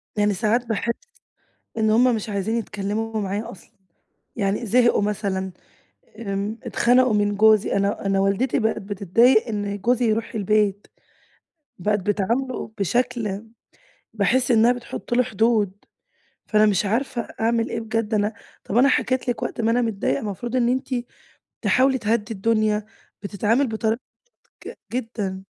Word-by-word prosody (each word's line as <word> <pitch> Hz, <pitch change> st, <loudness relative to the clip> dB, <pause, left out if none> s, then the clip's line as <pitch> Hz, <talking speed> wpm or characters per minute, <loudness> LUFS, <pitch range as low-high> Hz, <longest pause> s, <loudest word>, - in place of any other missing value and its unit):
يعني 205 Hz, -1 st, +2 dB
ساعات 225 Hz, +5 st, +1 dB
باحس 230 Hz, +1 st, -1 dB, 0.9 s
إن 220 Hz, 0 st, +2 dB
همّ 245 Hz, +2 st, +4 dB
مش 215 Hz, 0 st, -4 dB
عايزين 205 Hz, +3 st, -1 dB
يتكلموا 215 Hz, +1 st, -3 dB
معايا 200 Hz, +2 st, -3 dB
أصلًا، 185 Hz, -, -15 dB, 0.7 s
يعني 205 Hz, +2 st, -1 dB
زهقوا 235 Hz, +1 st, +3 dB
مثلًا، 195 Hz, -2 st, -2 dB, 0.7 s
آمم 205 Hz, +1 st, -3 dB
اتخنقوا 250 Hz, -1 st, +3 dB
من 205 Hz, -1 st, +1 dB
جوزي، 215 Hz, -1 st, +4 dB
أنا 200 Hz, 0 st, -1 dB
أنا 195 Hz, 0 st, +2 dB
والدتي 200 Hz, +8 st, +1 dB
بقت 220 Hz, -1 st, 0 dB
بتتضايق 205 Hz, +5 st, +3 dB
إن 205 Hz, -2 st, -3 dB
جوزي 240 Hz, +4 st, +1 dB
يروح 225 Hz, +2 st, -1 dB
البيت، 205 Hz, -1 st, +1 dB, 0.9 s
بقت 210 Hz, +3 st, +1 dB
بتعامله 220 Hz, +6 st, -1 dB
بشكل 210 Hz, 0 st, -1 dB, 0.7 s
باحس 245 Hz, +5 st, +1 dB
إنها 235 Hz, +1 st, +5 dB
بتحط 240 Hz, 0 st, -5 dB
له 250 Hz, -, +4 dB
حدود، 220 Hz, -4 st, +1 dB, 0.8 s
فأنا 215 Hz, -1 st, +4 dB
مش 205 Hz, -1 st, +2 dB
عارفة 240 Hz, +3 st, -1 dB, 0.2 s
أعمل 230 Hz, 0 st, +1 dB
إيه 230 Hz, -, -2 dB
بجد، 225 Hz, 0 st, -2 dB
أنا 210 Hz, +1 st, +1 dB, 0.3 s
طب 215 Hz, -, -2 dB
أنا 270 Hz, +3 st, +6 dB
حكيت 255 Hz, -2 st, 0 dB
لِك 240 Hz, -, -2 dB
وقت -, -, -3 dB
ما 225 Hz, +1 st, +2 dB
أنا 245 Hz, +1 st, +2 dB
متضايقة، 200 Hz, -, -1 dB
المفروض 230 Hz, +4 st, -4 dB
إن 240 Hz, -1 st, +2 dB
أنتِ 260 Hz, +2 st, -1 dB, 0.7 s
تحاولي 265 Hz, 0 st, +3 dB
تهدي 225 Hz, -1 st, -1 dB
الدنيا، 215 Hz, 0 st, +1 dB, 0.4 s
بتتعامل 220 Hz, +7 st, +1 dB
بطريقة 220 Hz, +2 st, -1 dB, 0.7 s
ج -, -, -6 dB, 0.2 s
جدًا. 225 Hz, -6 st, -3 dB
220 Hz, 140 wpm, -23 LUFS, 205-235 Hz, 0.9 s, أنا